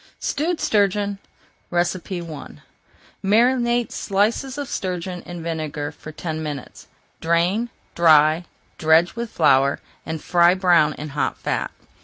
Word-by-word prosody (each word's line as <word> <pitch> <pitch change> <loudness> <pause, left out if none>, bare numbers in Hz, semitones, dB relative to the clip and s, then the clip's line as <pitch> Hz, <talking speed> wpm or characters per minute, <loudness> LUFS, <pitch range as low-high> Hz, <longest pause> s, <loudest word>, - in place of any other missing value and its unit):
STEWED 325 +3 -1
STURGEON 205 -1 +1 0.5
I - - -6 1.5
Marinate 240 +3 +2
slices 220 +7 0
of 285 -1 -4
sturgeon 180 -3 -4
in 175 -1 -7
vinegar 155 -3 -3
for 155 - -11
ten 160 0 -5
minutes. 145 -4 -7 0.3
Drain, 175 +8 +1 0.2
dry, 155 0 +5 0.3
dredge 160 +2 +4
with 235 0 -4
flour, 140 -5 +3 0.2
and 160 0 -4
fry 175 +2 +4
brown 175 -5 +4
in 150 +1 -7
hot 145 +1 -2
fat. - - -2
175 Hz, 115 wpm, -22 LUFS, 155-210 Hz, 1.5 s, dry